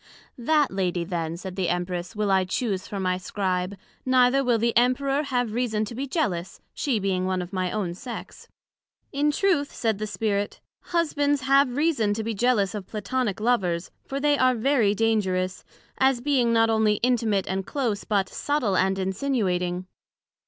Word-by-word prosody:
That 295 +4 +2
Lady 180 -2 -1
then, 170 -2 -3
said 185 0 -7
the 190 -3 0
Empress, 180 +2 -3
will 210 -1 0
I 190 -1 +4
chuse 190 0 -2
for 200 - -5
my 185 -1 0
Scribe, 185 0 -2 0.3
neither 255 +1 +4
will 245 -2 +2
the 230 +1 0
Emperor 270 +4 +2
have 245 -6 -1
reason 220 -3 0
to 215 - -8
be 270 +4 -4
jealous, 190 - -2
she 265 -6 0
being 190 -2 0
one 185 0 0
of 180 +2 -6
my 185 -1 -1
own 195 -5 -2
sex. 240 +7 -8 0.6
In 290 +2 +1
truth, 295 -2 +1
said 220 -3 -1
the 215 - -2
Spirit, 205 0 -2 0.3
Husbands 290 -4 +1
have 270 -1 +3
reason 275 -10 +2
to 220 - -3
be 225 +1 -2
jealous 215 -2 +2
of 205 -3 -6
Platonick 215 0 -2
Lovers, 190 -7 0
for 275 - -4
they 290 0 +2
are 255 -1 +4
very 225 -4 +2
dangerous, 190 -4 0 0.4
as 265 -2 +3
being 250 -3 +2
not 225 0 +4
onely 220 -1 +3
intimate 230 -6 +2
and 190 0 -3
close, 235 -8 -1
but 200 -3 +1
subtil 285 -10 -1
and 190 +1 +2
insinuating. 185 -4 -1
215 Hz, 170 wpm, -25 LUFS, 190-255 Hz, 0.6 s, I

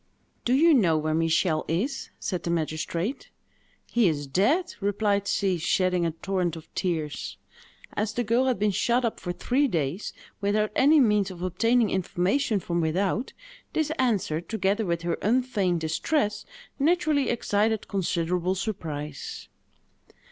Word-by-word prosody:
"Do 245 - +2
you 320 +5 +6
know 180 - +4
where 155 0 -1
Michel 160 0 +2
is?" 230 - -2
said 180 -4 -3
the 170 - -4
magistrate. 165 - -2 0.6
"He 235 -4 +2
is 145 -3 -1
dead!" 255 - +1
replied 200 0 0
she, 190 -4 +1
shedding 180 0 +1
a - - -1
torrent 175 +1 -2
of 160 -1 -12
tears. 160 -5 -3 0.6
As 210 0 -1
the 245 - -1
girl 235 +4 +2
had 255 - +1
been 210 +1 +2
shut 240 +5 +1
up 230 - -2
for 175 - -4
three 260 +10 +1
days, 165 - -2 0.3
without 210 +1 +1
any 295 +3 +5
means 210 -6 +3
of 180 -1 -8
obtaining 225 +5 +2
information 190 +5 0
from 170 -1 -1
without, 190 +9 0 0.4
this 315 -1 0
answer, 205 -11 +1
together 200 +3 -1
with 170 -1 -1
her 170 -1 -1
unfeigned 210 -7 +1
distress, 205 - -1 0.3
naturally 300 -2 +2
excited 220 -1 0
considerable 180 -1 0
surprise. 155 -8 -5
195 Hz, 140 wpm, -26 LUFS, 170-230 Hz, 0.6 s, you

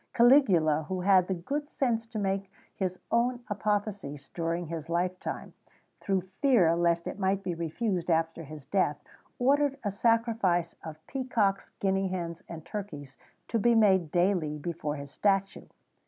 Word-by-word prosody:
Caligula, 190 - +5
who 185 0 -2
had 185 -1 +4
the 190 - -1
good 290 - -4
sense 230 -6 -1
to 225 -1 -7
make 195 -1 -1 0.2
his 185 -2 -2
own 240 +1 +1
apotheosis 205 -9 -2
during 170 +1 -2
his 165 0 -6
life 180 +2 0
time, - - -6 0.5
through 195 -2 0 0.2
fear 215 - +5
lest 170 0 +1
it - - -5
might 195 0 +1
be 180 -2 -2
refused 175 +3 -2
after 165 0 +1
his 150 -2 -10
death, 185 -7 +1 0.4
ordered 280 +2 +2
a 205 - -1
sacrifice 220 -6 +1
of 155 0 -9
peacocks, 230 -7 0
guinea 195 0 +1
hens, 175 -2 -4
and 160 -2 -8
turkeys 145 -10 -7 0.3
to 230 - 0
be 235 +2 +4
made 190 -7 +4
daily 175 -3 +1
before 150 -1 -4
his 140 -1 -8
statue. 195 -1 0
190 Hz, 155 wpm, -29 LUFS, 165-215 Hz, 0.5 s, Caligula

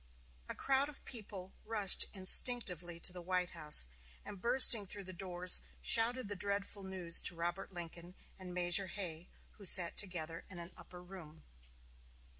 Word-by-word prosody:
A - - -6
crowd 275 +1 +1
of 295 - -8
people 200 -6 -9
rushed 210 -4 +1
instinctively 185 -4 +1
to 180 - +1
the 180 - -8
White 180 0 -3
House, 150 - +4 0.4
and, 200 -2 -11
bursting 235 -3 +4
through 200 +2 -8
the 185 0 -10
doors, 180 0 +6 0.2
shouted 235 +1 +1
the 205 - -5
dreadful 200 +1 -3
news 185 -3 0
to 175 - -2
Robert 175 +4 -6
Lincoln 175 0 -11 0.2
and 185 -1 -10
Major 180 +2 +2
Hay, 175 -2 -7 0.3
who - - -14
sat 180 -2 +4
together 165 -4 -5
in 185 - -11
an 170 +1 -10
upper 180 0 -15
room. 175 -4 -14
185 Hz, 155 wpm, -34 LUFS, 175-200 Hz, 0.4 s, doors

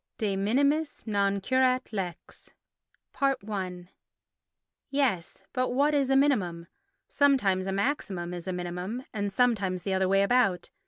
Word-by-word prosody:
De 205 -3 -1
Minimis 280 +10 +1
non 200 -2 +1
Curat 255 +3 +1
Lex 185 -4 -6 0.7
i 195 -9 -2 1.0
Yes, 265 - -1
but 255 0 0
what 285 +4 +2
is 280 -2 +2
a 270 - +3
minimum? 195 -12 +2 0.4
Sometimes 210 -10 +2
a - - -1
maximum 195 -5 -2
is 175 0 -7
a - - -1
minimum, 180 +7 -4
and 205 -1 -2
sometimes 195 -6 +1
the 195 - -1
other 190 0 +1
way 195 +1 +4
about. 200 -5 +2
200 Hz, 130 wpm, -28 LUFS, 185-260 Hz, 1.0 s, way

